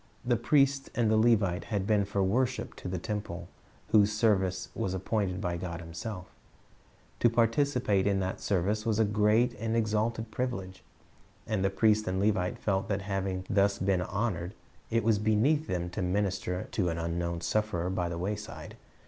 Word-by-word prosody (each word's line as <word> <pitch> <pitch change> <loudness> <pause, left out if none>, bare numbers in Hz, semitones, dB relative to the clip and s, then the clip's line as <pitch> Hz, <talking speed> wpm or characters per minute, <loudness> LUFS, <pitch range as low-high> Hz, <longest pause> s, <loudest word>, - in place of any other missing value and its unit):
"' - - -27
The 120 0 +3
priest 135 +3 +2
and 115 -3 +2
the - - +4
Levite 105 -5 +3
had 100 -4 -2
been 105 -1 +2
for 100 0 0
worship 125 +6 0
to - - -7
the 90 0 -2
temple 90 -3 -4 0.4
whose 105 -1 +5
service 105 -4 +1
was 95 -1 -2
appointed 95 -1 -1
by 90 -3 -2
God 85 -1 -5
Himself 85 +4 -6 0.9
To 120 - +5
participate 115 -3 +2
in 100 -1 +2
that 95 0 -3
service 100 +2 0
was 110 -2 0
a 110 - +4
great 105 +4 +3
and 115 +1 -1
exalted 110 0 0
privilege, 95 -7 -4 0.6
and 105 -3 -1
the 95 - +3
priest 110 +1 +2
and 95 0 0
Levite 100 -3 +1
felt 95 -2 -1
that 100 -1 -1
having 95 -1 -2
been - - -13
thus 100 0 +3
honored, 95 0 -1 0.3
it 115 0 +1
was 110 -2 +3
beneath 120 +9 +2
them 90 -1 -2
to 105 - -3
minister 95 -1 -1
to 95 -5 0
an 85 - -2
unknown 85 0 -2
sufferer 95 -3 -1
by 90 -2 -1
the 85 - -4
wayside. 105 +4 -5
100 Hz, 175 wpm, -30 LUFS, 95-110 Hz, 0.9 s, whose